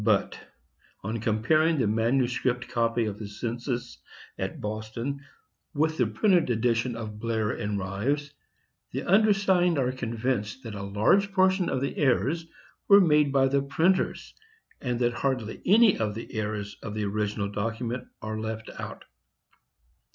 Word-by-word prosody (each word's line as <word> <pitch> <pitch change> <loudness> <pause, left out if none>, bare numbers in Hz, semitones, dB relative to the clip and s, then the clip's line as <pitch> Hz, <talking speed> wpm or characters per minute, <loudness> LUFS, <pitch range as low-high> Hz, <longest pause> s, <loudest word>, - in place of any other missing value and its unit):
"But, 105 -2 +1 0.6
on 110 +4 -3
comparing 155 +10 +2
the 125 - +2
manuscript 125 +3 +1
copy 115 -1 0
of 105 -1 -4
the 105 - -5
census 120 +4 -4 0.4
at - - -4
Boston 110 +6 -4 0.5
with 155 +1 +1
the 125 - +3
printed 175 - +2
edition 115 +1 +1
of 105 -2 -6
Blair 110 -2 -1
and 105 0 -3
Rives, 115 +10 -2 0.6
the - - -3
undersigned 195 -4 +3
are 130 -2 +1
convinced 120 -1 -3
that 115 -3 -7
a 100 - -6
large 105 - +2
portion 190 -1 +3
of 130 - -1
the 140 - -2
errors 150 +4 +1 0.4
were 200 0 +8
made 150 -6 +4
by 135 -1 +4
the 140 +1 +2
printers, 165 +7 0 0.5
and 125 -2 -1
that 120 0 +2
hardly 125 -4 -2
any 220 +2 +6
of 105 -2 -1
the 115 - -8
errors 105 -1 -3
of 105 -1 -6
the 105 -1 -1
original 100 0 -2
document 115 +4 -3 0.2
are 110 0 -3
left 110 0 -5
out. - - -7
120 Hz, 145 wpm, -27 LUFS, 110-145 Hz, 0.6 s, were